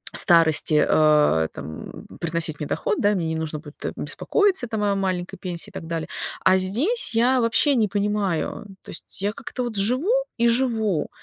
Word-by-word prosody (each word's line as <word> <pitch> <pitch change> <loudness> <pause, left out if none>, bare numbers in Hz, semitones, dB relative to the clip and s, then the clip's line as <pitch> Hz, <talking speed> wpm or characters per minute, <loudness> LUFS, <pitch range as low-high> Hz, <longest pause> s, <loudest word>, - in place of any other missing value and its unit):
старости, 160 -2 +5
э, 150 - +3
там 80 0 -9 0.2
приносить 165 -2 -1
мне 150 - -4
доход, 210 - -2
да. 205 +1 +3
Мне 175 - -2
не 160 - -2
нужно 160 -1 -4
будет 150 -1 -13 0.2
беспокоиться 395 - 0
там 220 -2 -3
о 200 -1 +1
маленькой 185 -1 -3
пенсии 180 +1 -5
и 210 - -23
так 165 - -8
далее, 165 -1 -4 0.4
а 185 0 +5
здесь 230 - +2
я 250 +2 +3
вообще 235 +5 +3
не 220 -4 +2
понимаю, 205 -2 -2 0.2
то - - -15
есть 165 - -6
я 205 +1 -1
как-то 250 - -6
вот 240 -2 -5
живу 250 - 0 0.2
и 235 - +3
живу, 230 - 0
195 Hz, 175 wpm, -23 LUFS, 165-230 Hz, 0.4 s, старости